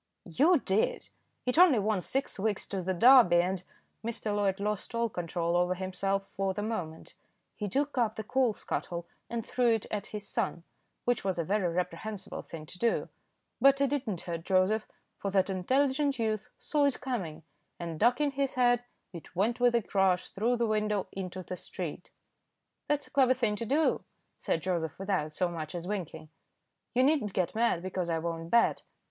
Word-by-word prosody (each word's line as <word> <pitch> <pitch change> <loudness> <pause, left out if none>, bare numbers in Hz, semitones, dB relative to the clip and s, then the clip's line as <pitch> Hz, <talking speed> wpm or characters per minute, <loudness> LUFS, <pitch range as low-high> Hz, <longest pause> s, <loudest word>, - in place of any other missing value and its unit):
"You 300 - +4
did. 210 -5 0 0.4
It 250 +6 +1
only 350 -8 +7
wants 205 -3 0
six 270 -5 -1
weeks 205 0 0
to 195 -2 -2
the 185 +1 -1
Derby, 235 -2 +7
and 180 +1 0 0.2
" - - -44
Mr. 220 -2 -2
Loyd 200 -1 +1
lost 210 +3 -3
all 230 0 +1
control 170 -2 -2
over 180 +1 +2
himself 195 +1 -2
for 195 -1 0
the 205 - -2
moment. 175 -8 -4 0.4
He 205 -2 -3
took 280 +8 0
up 220 -3 +1
the 220 - -4
coal 250 +1 +2
scuttle 170 -1 -4 0.2
and 235 -2 -3
threw 240 -2 +2
it 220 - -4
at 210 -1 -3
his 210 -1 -7
son, 190 -7 -2 0.4
which 245 -1 +1
was 190 -3 -1
a 170 - 0
very 190 0 +1
reprehensible 180 +4 -4
thing 160 -2 -9
to 180 - -12
do; 235 -1 +1 0.5
but 275 +1 +6
it 280 -1 +2
did 285 -3 -1
not 190 -6 -2
hurt 170 -2 -5
Joseph, 190 +4 +2 0.3
for 200 - -2
that 195 0 +2
intelligent 270 +8 +1
youth 215 -2 -1
saw 295 -2 +1
it 280 - +1
coming, 175 - -4 0.4
and 165 -2 -5
ducking 250 - +3
his 275 -1 -1
head, 245 -1 +3 0.3
it 170 0 -10
went 220 +7 +1
with 245 -1 +4
a 235 - +2
crash 190 -2 +1
through 235 +5 0
the 235 - +1
window 210 -2 0
into 185 -1 -5
the 180 - -5
street. - - -6 0.8
"That's 290 -1 0
a - - -19
clever 260 -2 +4
thing 230 -5 +1
to 230 - -4
do," 300 +5 +2 0.4
said 165 - -1
Joseph, 170 -4 -1
without 185 -6 -1
so 180 - +1
much 160 -1 -6
as 175 0 -4
winking. 180 -6 -5 0.7
"You 255 - +5
need 300 +2 +4
not 210 -3 -4
get 180 -2 0
mad 225 -6 +1
because 185 -2 -2
I 165 - +1
won't 165 0 -4
bet." 235 +3 +3
205 Hz, 190 wpm, -30 LUFS, 180-240 Hz, 0.8 s, only